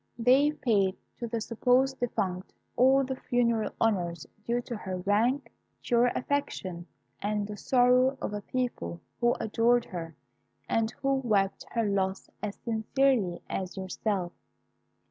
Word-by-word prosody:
They 265 +5 +4
paid 200 -9 +1 0.2
to 235 - -3
the 230 0 -2
supposed 250 +4 +2
defunct 190 -6 -2 0.2
all 265 +2 +5
the 265 0 -3
funeral 235 -3 +1
honours 175 -7 0 0.2
due 235 +2 0
to 240 - -5
her 190 -3 -4
rank, 215 +9 +1 0.3
to 240 - 0
your 235 +1 +5
affection, 195 -11 -2 0.3
and 210 0 -1
the 210 0 -6
sorrow 255 +4 +3
of - - -3
a 205 - -3
people 205 - -3 0.2
who 240 0 +3
adored 235 +2 +2
her, 165 -3 -6 0.5
and 225 -1 +1
who 275 0 +3
wept 205 -7 0
her 230 -2 +1
loss 195 -1 -1
as 205 -1 -3
sincerely 225 -4 +1
as 185 0 -4
yourself. 190 -1 -2
225 Hz, 140 wpm, -29 LUFS, 195-250 Hz, 0.5 s, all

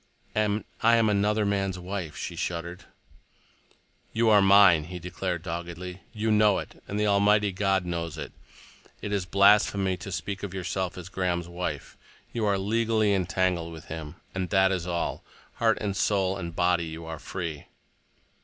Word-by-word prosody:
"And 105 -1 +1 0.2
I 115 +1 +5
am 115 -2 +3
another 105 +1 +2
man's 95 -2 0
wife," 90 -3 -5
she - - -5
shuddered. 85 +1 -4 1.3
"You 115 0 +3
are 105 -2 +7
mine," 95 -5 +6
he 90 +2 -7
declared 90 0 -4
doggedly. 85 +1 -6
"You 110 -1 -1
know 105 -1 +4
it, - - -7
and 100 - -3
the 105 - +2
Almighty 105 0 +3
God 95 -1 +1
knows 85 -2 -3
it. 70 -3 -6 0.7
It 105 - -3
is 95 -3 -1
blasphemy 100 -1 +4
to 100 - -8
speak 95 +2 -4
of 95 -2 -5
yourself 95 0 -3
as 90 -1 -7
Graham's 90 -2 -2
wife. 90 +1 -5 0.4
You 115 -2 -1
are 100 -1 +2
legally 110 +1 +1
entangled 90 -2 0
with 80 0 -11
him, 80 -2 -7 0.2
and 95 -2 -2
that 95 -1 +4
is 90 -2 -2
all. 85 -1 -2 0.3
Heart - - +3
and 100 -2 -2
soul 95 -2 +1
and 85 -3 -6
body 90 -1 +2
you 80 +1 -7
are 80 -2 -6
free." 80 -4 -5
95 Hz, 165 wpm, -27 LUFS, 85-100 Hz, 1.3 s, are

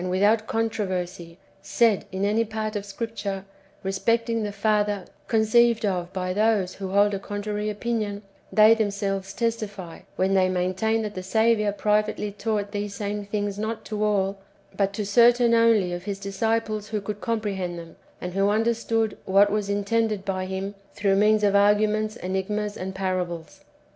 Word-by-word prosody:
219 185 +1 -1
without 215 +2 +3
controversy 185 -6 -3 0.2
said 220 +1 +2
in 190 +1 -1
any 215 +3 +2
part 220 -1 -4
of 205 0 -4
Scripture 200 -2 -4 0.4
respecting 230 +4 0
the 210 -1 -2
Father 205 -1 0 0.2
conceived 225 +1 +3
of 180 -3 -1
by 185 -1 -2
those 210 -3 +2
who 195 -1 -6
hold 205 +1 +3
a 195 - -2
contrary 210 +1 -3
opinion, 210 -1 -3 0.3
they 215 +1 +7
themselves 200 -3 -1
testify, 205 -5 -3 0.2
when 190 +1 +1
they 185 -1 +3
maintain 185 +5 0
that 210 -1 -4
the 185 - -5
Saviour 220 +2 +2
privately 210 0 0
taught 205 0 -2
these 205 -1 -4
same 205 0 -3
things 205 -1 -2
not 220 +1 -3
to 215 -1 -3
all, 195 -2 +1 0.4
but 195 -1 +1
to 210 0 -3
certain 235 +3 +5
only 225 -6 +4
of 175 +1 -6
His 200 -1 -3
disciples 215 +1 -1
who 215 -1 -2
could 205 0 -6
comprehend 200 -6 -2
them, 165 -1 -10 0.2
and 180 0 -5
who 195 +1 +2
understood 225 0 +1
what 200 +2 +4
was 210 -1 -1
intended 205 0 0
by 185 -1 -2
Him 190 +1 -4 0.2
through 200 -2 +2
means 210 +1 +3
of 200 -1 +3
arguments, 210 +1 +3
enigmas, 205 +3 -2
and 190 +1 -5
parables. 180 -4 -3
205 Hz, 160 wpm, -25 LUFS, 195-220 Hz, 0.4 s, they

